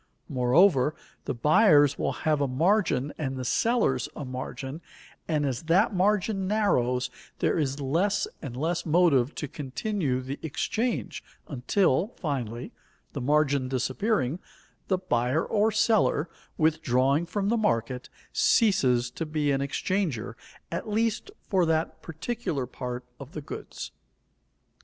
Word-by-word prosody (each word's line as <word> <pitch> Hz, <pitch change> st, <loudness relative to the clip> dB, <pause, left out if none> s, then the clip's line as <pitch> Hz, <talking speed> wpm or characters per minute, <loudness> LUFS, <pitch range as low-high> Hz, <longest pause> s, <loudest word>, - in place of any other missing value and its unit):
Moreover, 135 Hz, +3 st, +3 dB, 0.3 s
the -, -, -2 dB
buyers 150 Hz, -, +5 dB
will -, -, 0 dB
have 155 Hz, -2 st, +2 dB
a 140 Hz, -, +2 dB
margin 160 Hz, 0 st, +1 dB
and 135 Hz, -3 st, -2 dB
the 130 Hz, -, -4 dB
sellers 210 Hz, -, +1 dB
a 145 Hz, -, -5 dB
margin, 130 Hz, +3 st, -6 dB, 0.5 s
and 150 Hz, -3 st, +1 dB
as 130 Hz, -4 st, -2 dB
that 190 Hz, +7 st, +3 dB
margin 195 Hz, +1 st, +1 dB
narrows 125 Hz, -, +1 dB, 0.3 s
there -, -, +1 dB
is 140 Hz, -2 st, -1 dB
less 170 Hz, +9 st, +1 dB
and 125 Hz, -5 st, -6 dB
less 165 Hz, +4 st, -1 dB
motive 155 Hz, -6 st, +3 dB
to 150 Hz, -, -4 dB
continue 145 Hz, +1 st, -2 dB
the 130 Hz, +2 st, -6 dB
exchange 185 Hz, -, -2 dB, 0.2 s
until, 160 Hz, -, +1 dB
finally, 125 Hz, -, -3 dB, 0.4 s
the -, -, -4 dB
margin 140 Hz, -1 st, +2 dB
disappearing, 135 Hz, -, 0 dB, 0.5 s
the 190 Hz, -, +2 dB
buyer 130 Hz, -4 st, 0 dB
or 215 Hz, +1 st, +2 dB
seller, 210 Hz, -6 st, +2 dB, 0.3 s
withdrawing 145 Hz, -1 st, +2 dB
from 200 Hz, +1 st, -1 dB
the 235 Hz, -, +2 dB
market, 125 Hz, -, -1 dB, 0.2 s
ceases 130 Hz, -, +3 dB
to 165 Hz, -, -4 dB
be 155 Hz, -2 st, 0 dB
an 135 Hz, 0 st, +1 dB
exchanger, 150 Hz, -, -1 dB, 0.4 s
at -, -, -4 dB
least 225 Hz, -, 0 dB, 0.2 s
for 190 Hz, -3 st, +2 dB
that 160 Hz, -1 st, 0 dB
particular 165 Hz, -, -3 dB
part 125 Hz, 0 st, -6 dB
of 140 Hz, +2 st, -10 dB
the 155 Hz, -, -5 dB
goods. -, -, -7 dB
150 Hz, 130 wpm, -27 LUFS, 130-190 Hz, 0.5 s, buyers